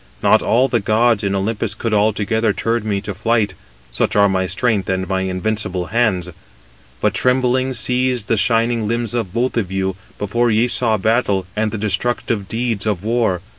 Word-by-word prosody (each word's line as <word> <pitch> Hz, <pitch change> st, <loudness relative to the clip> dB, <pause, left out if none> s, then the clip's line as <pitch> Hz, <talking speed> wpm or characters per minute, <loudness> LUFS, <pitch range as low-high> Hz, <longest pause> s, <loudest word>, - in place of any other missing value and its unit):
Not -, -, +5 dB
all 125 Hz, +4 st, +3 dB
the 120 Hz, -3 st, +1 dB
gods 110 Hz, +1 st, +2 dB
in 100 Hz, -1 st, 0 dB
Olympus 105 Hz, +1 st, -2 dB
could 115 Hz, 0 st, -3 dB
altogether 110 Hz, +1 st, +1 dB
turn 115 Hz, 0 st, -1 dB
me 100 Hz, -1 st, 0 dB
to 100 Hz, 0 st, -5 dB
flight, 105 Hz, 0 st, 0 dB, 0.4 s
such -, -, -1 dB
are 100 Hz, 0 st, +5 dB
my 95 Hz, -1 st, 0 dB
strength 100 Hz, +1 st, 0 dB
and 95 Hz, 0 st, -1 dB
my 95 Hz, -1 st, -1 dB
invincible 95 Hz, -1 st, -2 dB
hands. 105 Hz, -7 st, +1 dB, 0.7 s
But -, -, +1 dB
trembling 130 Hz, +1 st, +1 dB
seized 125 Hz, -1 st, 0 dB
the 115 Hz, -, +2 dB
shining 115 Hz, +1 st, +1 dB
limbs 115 Hz, 0 st, -1 dB
of 115 Hz, -7 st, -2 dB
both 120 Hz, +4 st, -1 dB
of 100 Hz, -5 st, -1 dB
you, 95 Hz, -1 st, -1 dB, 0.2 s
before 120 Hz, +4 st, 0 dB
ye 115 Hz, +2 st, +3 dB
saw 115 Hz, -3 st, +1 dB
battle, 105 Hz, -2 st, +1 dB
and 110 Hz, 0 st, 0 dB
the 110 Hz, -, -4 dB
destructive 105 Hz, 0 st, -1 dB
deeds 115 Hz, -2 st, -2 dB
of 100 Hz, -4 st, -1 dB
war. 110 Hz, -5 st, 0 dB
110 Hz, 175 wpm, -19 LUFS, 100-120 Hz, 0.7 s, Not